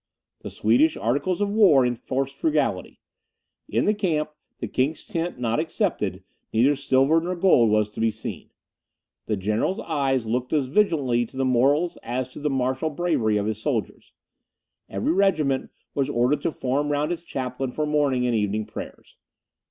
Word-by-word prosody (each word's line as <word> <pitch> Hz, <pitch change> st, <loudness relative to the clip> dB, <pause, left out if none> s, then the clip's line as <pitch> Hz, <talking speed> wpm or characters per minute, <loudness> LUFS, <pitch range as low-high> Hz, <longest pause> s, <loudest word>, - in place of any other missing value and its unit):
The -, -, -7 dB
Swedish 120 Hz, +9 st, +2 dB
articles 140 Hz, -, 0 dB
of 205 Hz, -, +1 dB
war 185 Hz, -, +5 dB
enforced 130 Hz, +3 st, -2 dB
frugality. 315 Hz, -2 st, -1 dB, 0.7 s
In -, -, +1 dB
the 210 Hz, -, +3 dB
camp, 165 Hz, -8 st, -1 dB, 0.3 s
the 115 Hz, -, -4 dB
King's 135 Hz, +8 st, -1 dB
tent 175 Hz, -, -3 dB
not 120 Hz, +1 st, 0 dB
excepted, 160 Hz, 0 st, -1 dB, 0.3 s
neither 130 Hz, +6 st, +3 dB
silver 135 Hz, +3 st, +3 dB
nor 180 Hz, +2 st, -3 dB
gold 170 Hz, -, +4 dB
was 105 Hz, 0 st, +2 dB
to -, -, -9 dB
be 115 Hz, 0 st, +3 dB
seen. 110 Hz, 0 st, -7 dB, 0.8 s
The 105 Hz, -, 0 dB
general's 110 Hz, -, -1 dB
eye 140 Hz, -4 st, 0 dB
looked 125 Hz, +2 st, -2 dB
as 145 Hz, -3 st, +2 dB
vigilantly 135 Hz, -, +2 dB
to 130 Hz, -, -14 dB
the 135 Hz, -, +1 dB
morals 140 Hz, +7 st, +2 dB
as 125 Hz, +1 st, -3 dB
to -, -, -10 dB
the 150 Hz, 0 st, -1 dB
martial 130 Hz, +3 st, 0 dB
bravery 145 Hz, -10 st, 0 dB
of 100 Hz, -, -1 dB
his 110 Hz, 0 st, -3 dB
soldiers; 115 Hz, -7 st, -3 dB, 0.8 s
every 100 Hz, +9 st, -1 dB
regiment 155 Hz, -9 st, +1 dB, 0.2 s
was 140 Hz, -1 st, 0 dB
ordered 135 Hz, +3 st, +1 dB
to 165 Hz, -, 0 dB
form 145 Hz, +2 st, -1 dB
round 145 Hz, +3 st, 0 dB
its 175 Hz, -, -3 dB
chaplain 130 Hz, -4 st, -4 dB
for 155 Hz, +4 st, -2 dB
morning 145 Hz, -4 st, +1 dB
and 120 Hz, -, +1 dB
evening 105 Hz, 0 st, 0 dB
prayers. -, -, -10 dB
135 Hz, 165 wpm, -24 LUFS, 120-155 Hz, 0.8 s, war